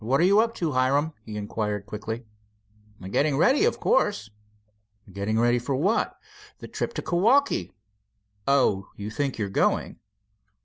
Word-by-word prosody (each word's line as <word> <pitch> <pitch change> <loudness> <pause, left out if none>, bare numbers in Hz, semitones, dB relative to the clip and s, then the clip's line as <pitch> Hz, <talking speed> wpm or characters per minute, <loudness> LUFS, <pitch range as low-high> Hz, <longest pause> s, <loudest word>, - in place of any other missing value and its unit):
"What 130 +5 +1
are - - +4
you 200 +3 +5
up 230 +1 +1
to, 165 -3 -1
Hiram," 140 +4 +1
he 110 -1 -8
inquired 105 -1 -3
quickly. 110 +3 -6 0.8
"Getting 140 +8 +1
ready, 270 - +4
of 470 - 0
course." 200 - +1 0.8
"Getting 105 +3 -1
ready 120 +1 +3
for 130 +3 -2
what?" 190 - 0 0.4
"The - - -10
trip - - -4
to - - -3
Kewaukee." 205 - +2 0.8
"Oh, 105 -8 +2
you 105 +1 -6
think 140 +3 -2
you're 105 -3 -2
going?" 95 - 0
130 Hz, 145 wpm, -25 LUFS, 105-175 Hz, 0.8 s, you